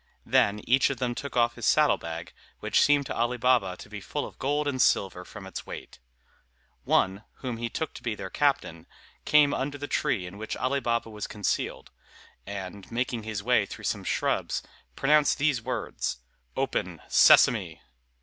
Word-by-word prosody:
Then 105 +1 +3
each 130 +2 +3
of 140 - -3
them 125 -1 -1
took 140 +1 -6
off 120 0 +3
his 120 - -3
saddle 150 -1 +4
bag, 85 0 -7 0.3
which - - +2
seemed 145 -1 +4
to - - -4
Ali 120 +2 0
Baba 120 -7 +2
to - - -11
be 100 0 -8
full 145 +8 -3
of - - -12
gold 145 +2 0
and 130 -3 0
silver 95 -2 +2
from 95 +2 -11
its 95 - -7
weight. - - -9 0.9
One, 95 +2 +2 0.2
whom 125 -3 -3
he 120 0 -3
took 160 - -4
to - - -10
be 115 -3 -2
their 95 - -7
captain, 110 - 0 0.4
came 150 -1 +5
under 145 +2 -2
the 145 +1 -5
tree 135 -14 0
in 95 +3 -9
which 110 - -4
Ali 130 +2 0
Baba 115 -2 -1
was 105 -1 -5
concealed; 105 -1 -3 0.6
and, 100 -1 -7
making 120 0 -1
his 105 -2 -5
way - - +3
through - - -9
some - - -1
shrubs, - - -1 0.3
pronounced 150 +1 +3
these 140 -4 +1
words - - -3 0.4
"Open, - - -2
Sesame!" - - +5
120 Hz, 180 wpm, -27 LUFS, 100-140 Hz, 0.9 s, came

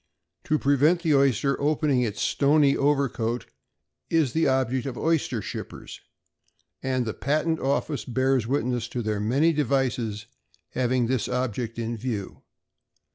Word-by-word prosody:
To 155 - +2
prevent 150 +5 +3
the 160 -3 +3
oyster 140 0 +2
opening 145 -3 +2
its 105 -4 -2
stony 145 0 +3
overcoat, 135 -5 0 0.6
is 155 -7 +2
the 160 - +2
object 130 -1 0
of 125 -3 -5
oyster 155 - 0
shippers; - - -8 0.8
and 130 -2 -1
the 110 - -3
Patent 155 +3 0
Office 140 +2 -1
bears 130 -2 +1
witness 125 -3 -1
to 120 0 -4
their 105 -1 -1
many 135 +10 +2
devices 125 -7 -1 0.4
having 125 -1 0
this 125 -2 0
object 120 -2 -2
in 115 0 -3
view. 110 -4 -5
130 Hz, 130 wpm, -25 LUFS, 120-145 Hz, 0.8 s, prevent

